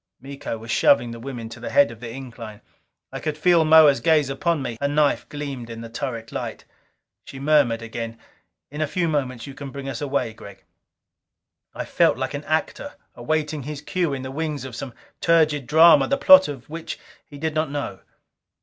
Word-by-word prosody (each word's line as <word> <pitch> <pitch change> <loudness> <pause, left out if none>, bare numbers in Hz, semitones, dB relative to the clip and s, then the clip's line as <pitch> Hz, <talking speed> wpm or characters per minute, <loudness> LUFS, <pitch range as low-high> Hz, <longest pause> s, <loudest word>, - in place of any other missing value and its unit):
Miko 135 -3 -6
was 110 +1 -7
shoving 120 -2 +3
the 115 - -8
women 120 -2 -6
to 115 +1 -10
the 120 - -6
head 140 -4 +4
of 115 - -12
the 120 -1 -7
incline. 115 -4 -9 0.5
I - - -5
could 155 -1 -3
feel 170 +1 +4
Moa's 155 -3 +6
gaze 155 -4 +2
upon 160 +1 -1
me. 120 -3 -5
Her 140 - +2
knife 145 0 +1
gleamed 140 -5 -6
in 115 0 -7
the 115 - -8
turret 115 -2 -5
light. - - -6 0.6
She 140 - -11
murmured 135 -5 +2
again, 115 0 -6 0.5
"In 150 +2 -5
a 155 - +1
few 170 +3 -1
moments 130 -6 -2
you 140 - -9
can 140 0 -8
bring 140 0 -7
us 135 - -5
away, 140 -5 -1
Gregg." 100 -3 -13 1.1
I - - -4
felt - - +2
like - - -3
an - - -5
actor - - -2 0.2
awaiting 150 +3 -2
his 145 +2 -6
cue 175 -1 -1
in 135 -1 -4
the 130 - -6
wings 150 -2 -3
of 130 -3 -8
some 125 -1 -7 0.2
turgid 155 -5 +2
drama 160 -1 +6
the 275 - +1
plot 280 - +8
of 140 -4 -8
which 165 +2 -6 0.3
he 145 - -13
did 160 +1 -2
not 155 -1 0
know. 145 0 -4
140 Hz, 195 wpm, -23 LUFS, 120-155 Hz, 1.1 s, plot